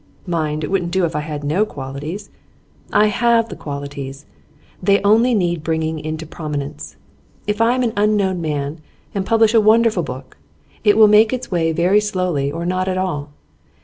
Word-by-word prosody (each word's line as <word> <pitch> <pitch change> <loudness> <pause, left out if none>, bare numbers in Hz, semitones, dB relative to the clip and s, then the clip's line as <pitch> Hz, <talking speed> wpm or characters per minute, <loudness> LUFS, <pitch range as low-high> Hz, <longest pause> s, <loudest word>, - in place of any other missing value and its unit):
Mind, 155 -4 -2
it 150 - -4
wouldn't 180 -3 0
do 185 0 +1
if 160 - -4
I - - +1
had 150 -1 -5
no 155 +8 +1
qualities. 145 +2 -6 0.6
I 210 - +4
have 230 +2 +2
the - - -7
qualities; 140 -1 -7 0.6
they 200 +2 +3
only 225 +4 +4
need 175 -5 0
bringing 160 0 -1
into 155 +1 -5
prominence. 150 -3 -6 0.5
If 210 +1 -1
I 235 +2 +4
am 255 - 0
an 230 -2 0
unknown 205 -3 +1
man, 150 0 -3 0.3
and 195 -2 -2
publish 225 -1 +4
a 225 - +6
wonderful 220 -2 +4
book, 130 -3 -8 0.5
it 210 -1 +4
will 220 -1 +8
make 215 +1 +5
its 255 -4 -4
way 165 -2 +1
very 180 +5 +3
slowly, 185 -9 -1
or 165 +3 -4
not 185 +1 -1
at 185 -1 -1
all. 160 -6 -2
180 Hz, 180 wpm, -19 LUFS, 150-210 Hz, 0.6 s, will